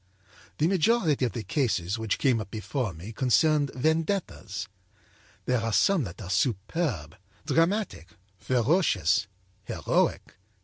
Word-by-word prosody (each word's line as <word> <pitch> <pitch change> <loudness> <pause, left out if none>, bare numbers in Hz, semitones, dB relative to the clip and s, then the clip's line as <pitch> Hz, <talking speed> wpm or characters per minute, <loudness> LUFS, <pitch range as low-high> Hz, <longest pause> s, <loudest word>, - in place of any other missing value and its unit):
âThe 155 - +2
majority 175 - +2
of 120 - -3
the 115 - -4
cases 110 - -1
which 110 -2 -1
came 125 -5 +2
up 105 - -8
before 110 +2 -3
me 85 +7 -9
concerned 145 +4 +3
vendettas. 160 - -1 0.8
There 125 -2 +1
are 115 0 -1
some 150 - +3
that 85 -2 -9
are 95 -5 -7
superb, 100 - -1 0.3
dramatic, 170 - 0 0.3
ferocious, 120 - +2 0.4
heroic. - - -1
125 Hz, 120 wpm, -27 LUFS, 100-160 Hz, 0.8 s, concerned